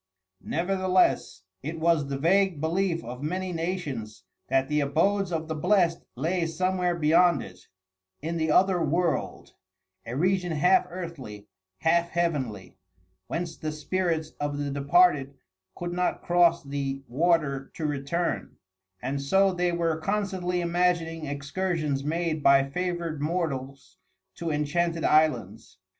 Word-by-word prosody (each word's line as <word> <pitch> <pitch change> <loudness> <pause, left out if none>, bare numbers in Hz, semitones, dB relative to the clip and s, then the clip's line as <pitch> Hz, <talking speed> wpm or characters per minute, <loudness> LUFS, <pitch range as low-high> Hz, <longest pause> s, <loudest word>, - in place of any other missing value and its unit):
Nevertheless, 185 - +1 0.2
it 160 +3 -5
was 160 -3 +2
the 140 0 -3
vague 185 +2 +2
belief 170 +2 0
of 125 +2 -7
many 180 +4 -3
nations 150 - -4 0.2
that 135 0 +2
the 150 +1 +1
abodes 175 +7 +1
of 160 -1 -2
the 160 - -2
blest 175 +1 +2
lay 165 +6 0
somewhere 180 +2 0
beyond 170 -1 +4
it 90 -1 -13 0.5
in 165 +3 -3
the 160 -1 0
"other 180 +1 +3
world," 170 +3 -1 0.5
a 120 - -4
region 180 +2 +1
half 180 +4 +4
earthly, 160 - -7 0.4
half 170 +1 +2
heavenly, 130 - -2 0.5
whence 165 -1 -3
the 155 - -4
spirits 160 0 -1
of 145 0 -2
the 145 -1 -2
departed 140 0 +3 0.4
could 175 0 -4
not 180 0 -1
cross 175 -1 +3
the 140 -1 -4
water 140 -1 +1
to 160 - -4
return; 150 +4 -2 0.5
and 140 +2 -2
so 190 +7 +3
they 180 0 0
were 165 -2 0
constantly 190 -2 -1
imagining 170 -2 0
excursions 145 0 -2
made 160 +1 -1
by 140 -1 +5
favored 170 -1 -3
mortals 140 -5 -3 0.4
to 170 - -4
enchanted 165 +3 0
islands. 135 -11 +1
165 Hz, 130 wpm, -27 LUFS, 140-175 Hz, 0.5 s, by